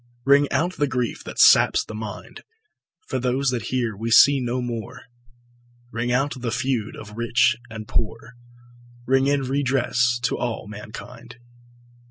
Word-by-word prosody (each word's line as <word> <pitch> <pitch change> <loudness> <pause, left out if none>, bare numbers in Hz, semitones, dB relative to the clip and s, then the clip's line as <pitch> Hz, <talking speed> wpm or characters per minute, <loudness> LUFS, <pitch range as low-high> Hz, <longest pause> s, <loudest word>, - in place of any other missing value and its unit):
Ring 140 +1 +4
out 180 +3 0
the 145 - +1
grief 125 -2 -3
that - - -8
saps - - +5
the - - -9
mind, 105 -1 -8 0.6
For - - -3
those 130 +2 0
that 120 -2 -3
here 120 -4 -1
we 115 +3 -4
see 140 +4 +6
no 125 0 -2
more, 120 0 -5 0.9
Ring 120 +1 -2
out 135 +3 +1
the 120 - -2
feud 125 -2 -2
of 105 -1 -11
rich 120 +1 +2
and 110 -1 -8
poor, 115 +1 -3 0.7
Ring 135 +1 +2
in 140 0 +2
redress 130 -2 +1
to 120 - -1
all 120 -3 -3
mankind. 120 +4 -10
125 Hz, 150 wpm, -23 LUFS, 115-130 Hz, 0.9 s, see